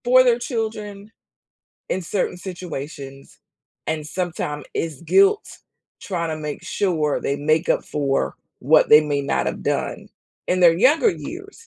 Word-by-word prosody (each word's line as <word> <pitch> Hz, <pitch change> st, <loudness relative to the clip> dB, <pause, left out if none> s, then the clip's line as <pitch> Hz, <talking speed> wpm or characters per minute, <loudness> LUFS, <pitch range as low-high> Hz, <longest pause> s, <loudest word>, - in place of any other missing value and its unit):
For 255 Hz, +1 st, +6 dB
their 245 Hz, -1 st, +3 dB
children 215 Hz, -4 st, -4 dB, 0.8 s
in 190 Hz, -, -1 dB
certain 180 Hz, +1 st, -2 dB
situations, 150 Hz, -7 st, -8 dB, 0.5 s
and 155 Hz, -1 st, -2 dB
sometime 155 Hz, -4 st, -3 dB
it's 160 Hz, -5 st, -3 dB
guilt 395 Hz, -, +4 dB, 0.6 s
tryna 170 Hz, -4 st, -3 dB
make 150 Hz, -1 st, -5 dB
sure 160 Hz, -7 st, 0 dB
they 140 Hz, -, -1 dB
make 155 Hz, +4 st, +1 dB
up -, -, +2 dB
for 140 Hz, -2 st, -1 dB, 0.2 s
what 155 Hz, +4 st, +4 dB
they 150 Hz, -, +9 dB
may 145 Hz, -2 st, -1 dB
not 140 Hz, -, -1 dB
have -, -, -3 dB
done -, -, -2 dB, 0.4 s
in 185 Hz, -, +1 dB
their 170 Hz, -2 st, +6 dB
younger 295 Hz, -, +4 dB
years. 395 Hz, +6 st, -9 dB
170 Hz, 140 wpm, -22 LUFS, 150-220 Hz, 0.8 s, they